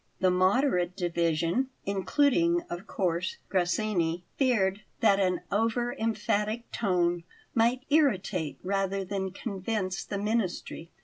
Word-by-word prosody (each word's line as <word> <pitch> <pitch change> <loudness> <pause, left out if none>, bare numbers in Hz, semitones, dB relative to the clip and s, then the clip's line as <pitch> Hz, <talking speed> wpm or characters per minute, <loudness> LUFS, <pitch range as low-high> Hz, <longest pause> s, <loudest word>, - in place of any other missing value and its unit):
The 185 -1 +3
moderate 185 -1 +2
division 170 +5 +1 0.2
including, 290 - +2
of 175 +4 -6
course, 180 -1 -1
Grassini 175 -2 0
feared 210 -7 +2 0.2
that 200 -3 +4
an 185 -2 +1
over 230 +3 +1
emphatic 220 0 -1
tone 175 -4 +1 0.3
might 240 +3 +2
irritate 195 - +2
rather 195 0 -1
than 190 0 -2
convince 190 -1 -3
the 200 - -4
ministry. 200 -5 -2
195 Hz, 110 wpm, -29 LUFS, 180-225 Hz, 0.3 s, that